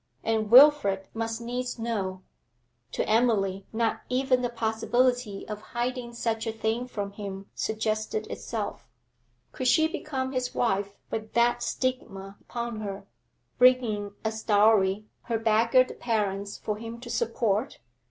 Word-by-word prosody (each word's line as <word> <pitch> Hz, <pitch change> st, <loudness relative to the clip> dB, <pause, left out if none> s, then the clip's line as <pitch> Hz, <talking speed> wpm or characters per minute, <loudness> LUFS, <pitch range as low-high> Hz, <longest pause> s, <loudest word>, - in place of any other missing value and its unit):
And 220 Hz, -1 st, 0 dB
Wilfrid 245 Hz, -7 st, +7 dB
must 225 Hz, 0 st, -3 dB
needs 245 Hz, +1 st, -3 dB
know; 195 Hz, -5 st, -3 dB, 0.7 s
to -, -, -2 dB
Emily 205 Hz, -4 st, +2 dB
not 230 Hz, 0 st, 0 dB
even 255 Hz, 0 st, +2 dB
the 245 Hz, -, 0 dB
possibility 235 Hz, -1 st, 0 dB
of 210 Hz, -1 st, -6 dB, 0.2 s
hiding 245 Hz, 0 st, -2 dB
such 225 Hz, -1 st, -1 dB
a -, -, 0 dB
thing 225 Hz, +2 st, -2 dB
from 205 Hz, -5 st, -4 dB
him 200 Hz, -1 st, -7 dB
suggested 220 Hz, -, -2 dB
itself. -, -, -5 dB, 0.6 s
Could 255 Hz, -, -2 dB
she 315 Hz, +5 st, +5 dB
become 265 Hz, -5 st, -3 dB
his 255 Hz, -2 st, -2 dB
wife 200 Hz, -3 st, 0 dB
with 220 Hz, -1 st, -4 dB
that 235 Hz, +1 st, +3 dB
stigma 195 Hz, -7 st, -3 dB
upon 235 Hz, -2 st, -5 dB
her, 200 Hz, -1 st, -5 dB, 0.5 s
bringing 235 Hz, -5 st, +4 dB
as 220 Hz, 0 st, -2 dB
dowry 205 Hz, -1 st, +3 dB, 0.2 s
her 230 Hz, -2 st, 0 dB
beggared 230 Hz, +3 st, +3 dB
parents 205 Hz, -3 st, -1 dB
for 210 Hz, -1 st, -3 dB
him 230 Hz, +1 st, -7 dB
to 240 Hz, 0 st, -9 dB
support? 230 Hz, +1 st, 0 dB
225 Hz, 135 wpm, -27 LUFS, 205-245 Hz, 0.7 s, Wilfrid